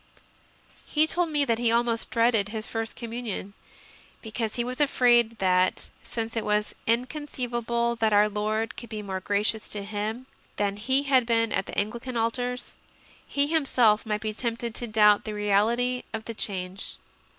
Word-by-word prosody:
He 305 +1 +4
told 345 +1 +1
me 295 -2 +2
that 230 -3 +1
he 235 -1 +2
almost 235 -1 +1
dreaded 230 -3 +2
his 220 0 -4
First 225 0 -3
Com 230 -1 -7
munion, 225 -4 -4 0.7
because 220 -1 -3
he 240 - 0
was 255 +4 -4
afraid 240 -5 +4
that, 185 -1 +1
since 230 0 -4
it 225 - -1
was 210 0 0
inconceivable 240 -2 -1
that 220 -1 +2
Our 205 0 +5
Lord 215 +2 -2
could 235 - -9
be 215 -2 -5
more 190 -2 -3
gracious 205 +3 0
to 205 -1 -2
him 215 +4 -4 0.3
than 200 -1 -1
He 260 +6 +2
had 260 -4 +3
been 230 -1 +2
at 195 - -1
Anglican 235 +4 -2
altars, 245 +2 -2 0.5
he 280 0 +2
him 320 +1 +1
self 220 -5 +4
might 210 -2 -2
be 215 -1 -3
tempted 235 0 -3
to 240 - -5
doubt 210 -1 +5
the 215 - -5
reality 225 +5 +2
of 220 -1 -4
the 230 - -5
change. 190 -2 -3
225 Hz, 170 wpm, -26 LUFS, 210-245 Hz, 0.7 s, Our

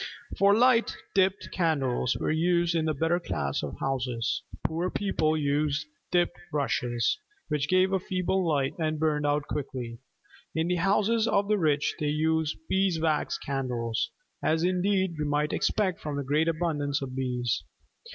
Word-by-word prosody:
For 200 +1 +5
Light, 240 0 +4 0.2
dipped 190 0 +1
candles 135 -8 +1
were - - -1
used 170 +1 +2
in 165 -2 +1
the 155 - +1
better 165 +4 +1
class 70 - -2
of - - -5
houses. 125 -3 -1 0.2
Poor 170 +3 -1
people 160 -7 0
used 145 +1 0 0.2
dipped 175 -1 +1
rushes, 125 - 0 0.3
which 150 -1 0
gave 185 +1 +3
a 190 - +3
feeble 185 0 0
light 145 -5 +1
and 155 -1 0
burned 150 -1 +1
out 145 0 +1
quickly. 125 -5 -4 0.6
In 160 +2 0
the 180 - +1
houses 210 +5 +2
of 200 0 +2
the 210 -1 +3
rich 150 -3 +2
they 150 - 0
used 155 +1 +1
beeswax 165 -5 +1
candles, 125 -4 -2 0.3
as 160 +1 +1
indeed 185 -1 +1
we 150 - 0
might 150 +1 0
expect 190 -5 +1
from 150 -2 -3
the 140 - -1
great 150 +4 +1
abundance 150 -4 0
of 130 -1 -6
bees. 125 -2 -1
155 Hz, 155 wpm, -28 LUFS, 140-180 Hz, 0.6 s, For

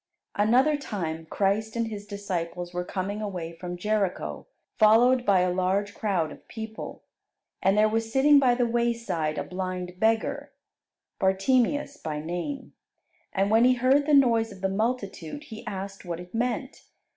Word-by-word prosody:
Another 255 +9 +3
time 165 - -4
Christ 210 +5 0
and 230 -1 0
His 205 -1 -7
disciples 180 -4 -4
were 180 0 -2
coming 195 +3 -3
away 180 -5 -4
from 175 +1 -6
Jericho, 205 0 -2 0.3
followed 240 +3 +5
by 195 -3 +5
a 180 0 +1
large 190 +3 0
crowd 180 -7 -1
of - - -14
people. 220 -1 -7 0.6
And 195 +2 +3
there 215 +1 +5
was 225 +1 -1
sitting 280 +3 +6
by 250 -3 +4
the 245 0 +2
wayside 230 -10 -1
a - - -1
blind 180 -1 -5
beggar, 225 +1 0 0.7
Bartimeus 250 +9 +1
by 155 - -4
name; 175 - -5 0.6
and 195 +1 +1
when 225 +2 +5
he 255 +1 +5
heard 265 +4 +3
the 300 - +5
noise 230 -5 +4
of 195 -2 -12
the 190 - +1
multitude, 210 - -3
he 220 -6 -10
asked 195 -1 -6
what 175 -2 -5
it 180 0 -11
meant. 245 +3 -2
210 Hz, 155 wpm, -26 LUFS, 185-235 Hz, 0.7 s, sitting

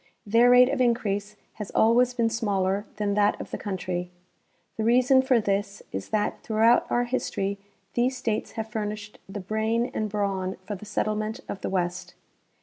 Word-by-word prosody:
Their 230 +4 +5
rate 250 0 +7
of - - 0
increase 210 -4 0 0.3
has 205 - -5
always 245 +3 +4
been 230 -2 +1
smaller 200 -3 0
than 210 -1 -1
that 205 0 +2
of - - -8
the - - -3
country. 180 -3 -3 0.7
The 220 - -2
reason 250 +3 +5
for 260 -2 +3
this 200 -1 -2
is 95 0 -5
that 210 -1 -1
throughout 225 +2 +3
our 240 - +2
history 200 -5 -2 0.3
these 255 +2 +1
states 225 -4 -2
have 220 -1 -4
furnished 210 -1 -5
the 205 - -5
brain 220 +4 -1
and 215 -1 -2
brawn 195 -2 -1
for 210 - -4
the 205 +1 -8
settlement 215 +1 -2
of 195 - -6
the - - -2
west. 180 -1 -2
215 Hz, 170 wpm, -26 LUFS, 200-235 Hz, 0.7 s, rate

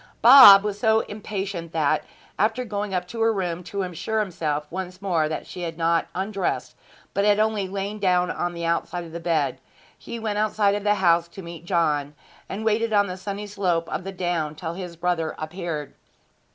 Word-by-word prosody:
Bob 230 -5 +10
was 205 -1 -3
so 220 0 +3
impatient 195 -5 -5
that, 155 -1 +1 0.4
after 220 +5 +1
going 210 -2 -3
up 180 -1 -2
to 225 +5 -6
her 225 0 +4
room 180 -4 -3
to 200 +2 -3
assure 185 +5 -3
himself 155 -7 -2
once 185 0 -5
more 170 -6 0
that 155 - -4
she 180 - -8
had 165 -2 -4
not 165 0 +1
undressed, 195 +1 -2 0.4
but 200 - +1
had 205 0 +4
only 215 -3 +1
lain 200 +2 -4
down 180 -2 +2
on 175 0 -3
the 170 0 -4
outside 170 +1 -1
of 165 - -11
the 170 - -6
bed, 155 -6 0 0.4
he 235 - -8
went 215 -2 -2
out 215 0 -1
of 205 0 +2
the 210 0 +3
house 170 -3 +3
to 185 +3 -11
meet 170 -1 -9
John, 150 -5 0 0.3
and 215 +3 -5
waited 225 +1 +1
on 205 -1 +4
the 180 -2 -5
sunny 200 +2 -5
slope 180 -5 -1
of 180 - -3
the 195 - -5
down 175 -5 -2
till 165 0 -5
his 180 -1 -7
brother 170 -2 -1
appeared. 155 -2 -5
185 Hz, 195 wpm, -24 LUFS, 170-205 Hz, 0.4 s, Bob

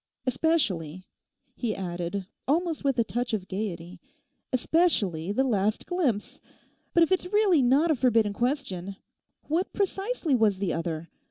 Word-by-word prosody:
Especially,' 215 - 0 0.5
he 230 -4 -2
added 180 +1 -4 0.2
almost 325 +2 0
with 275 -2 +1
a 235 - +4
touch 240 +1 -2
of 190 -3 -5
gaiety, 185 -3 -5 0.5
'especially 230 - +1
the 260 +6 +2
last 215 -4 0
glimpse. 260 - -1 0.5
But 340 - +7
if 330 - 0
it's 370 -1 +1
really 395 -5 +4
not 275 +7 +4
a - - +3
forbidden 230 -5 +2
question, 200 - -2 0.5
what 335 +5 -1
precisely 390 - -1
was 220 -5 +3
the 190 -2 -1
other? 165 -1 -3
240 Hz, 140 wpm, -27 LUFS, 190-315 Hz, 0.5 s, But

